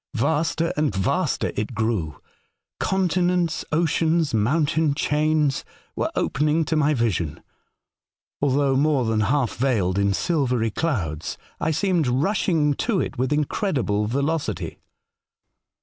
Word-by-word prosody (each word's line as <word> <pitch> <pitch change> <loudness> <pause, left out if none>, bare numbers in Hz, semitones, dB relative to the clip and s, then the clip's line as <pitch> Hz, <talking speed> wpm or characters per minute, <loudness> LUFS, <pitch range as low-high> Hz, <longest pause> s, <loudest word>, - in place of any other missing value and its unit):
Vaster 160 +6 0
and 150 -9 0
vaster 95 0 0
it 110 +3 -3
grew. 105 - -1 0.6
Continents, 180 -2 +1
oceans, 160 -1 +1
mountain 145 +6 +1
chains 150 -1 +1 0.3
were - - -1
opening 150 +3 +1
to 160 - -1
my 150 0 +2
vision, 100 - -1 1.0
although 140 -1 +2
more 140 -2 +2
than 110 -1 +1
half 120 +4 +1
veiled 105 -8 +1
in 100 0 +2
silvery 125 - 0
clouds. 95 - -2 0.2
I - - 0
seemed 170 -2 +1
rushing 155 - +1
to 200 - 0
it - - -3
with 130 +2 0
incredible 135 - 0
velocity. 140 +6 -2
145 Hz, 115 wpm, -23 LUFS, 115-160 Hz, 1.0 s, my